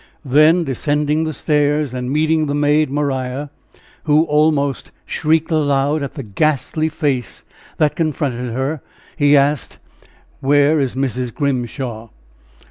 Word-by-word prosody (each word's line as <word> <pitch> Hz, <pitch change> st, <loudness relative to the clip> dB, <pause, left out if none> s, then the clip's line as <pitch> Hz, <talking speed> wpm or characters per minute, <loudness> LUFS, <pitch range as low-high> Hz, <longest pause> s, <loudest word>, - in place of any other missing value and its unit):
Then, 155 Hz, +6 st, +4 dB
descending 150 Hz, +2 st, 0 dB
the 155 Hz, -, -2 dB
stairs, 150 Hz, -1 st, 0 dB
and 125 Hz, 0 st, -4 dB
meeting 155 Hz, +1 st, +1 dB
the 145 Hz, -, -1 dB
maid 150 Hz, 0 st, +2 dB
Maria, 135 Hz, -1 st, -2 dB, 0.5 s
who 155 Hz, 0 st, +4 dB
almost 150 Hz, -3 st, +1 dB, 0.2 s
shrieked 160 Hz, +1 st, 0 dB
aloud 145 Hz, -1 st, +1 dB
at 140 Hz, -, -5 dB
the 140 Hz, -, -5 dB
ghastly 155 Hz, +7 st, 0 dB
face 140 Hz, -5 st, -3 dB, 0.3 s
that 150 Hz, -2 st, +1 dB
confronted 135 Hz, -6 st, -2 dB
her, 135 Hz, +5 st, -2 dB, 0.3 s
he 145 Hz, 0 st, +4 dB
asked: 140 Hz, 0 st, 0 dB, 0.6 s
"Where 145 Hz, +3 st, +3 dB
is 135 Hz, -3 st, -1 dB
Mrs. 130 Hz, -2 st, -2 dB
Grimshaw?" 125 Hz, -4 st, -3 dB
145 Hz, 125 wpm, -18 LUFS, 135-155 Hz, 0.6 s, Then